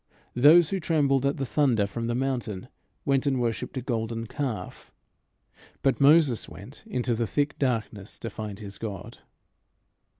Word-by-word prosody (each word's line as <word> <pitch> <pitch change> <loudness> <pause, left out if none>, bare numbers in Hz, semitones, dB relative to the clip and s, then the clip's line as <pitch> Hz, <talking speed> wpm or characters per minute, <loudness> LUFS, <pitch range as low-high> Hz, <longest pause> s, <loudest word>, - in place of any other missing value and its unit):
Those 150 +6 +6
who 195 - -1
trembled 140 -5 +2
at 140 - -1
the 135 - -2
thunder 125 -6 +2
from 115 +3 -4
the 120 - -1
mountain 125 -7 -3 0.4
went 140 0 +2
and 135 -2 +1
worshipped 120 +2 -2
a 130 - -3
golden 115 -2 -2
calf; 115 -7 -5 0.9
but 135 0 +2
Moses 145 -4 +5
went 100 +9 -11
into 125 - -1
the 115 0 -1
thick 145 +6 -1
darkness 110 -6 -2
to 115 - -6
find 105 -3 -6
his 100 -2 -9
God. 100 -5 -7
125 Hz, 155 wpm, -27 LUFS, 110-140 Hz, 0.9 s, Those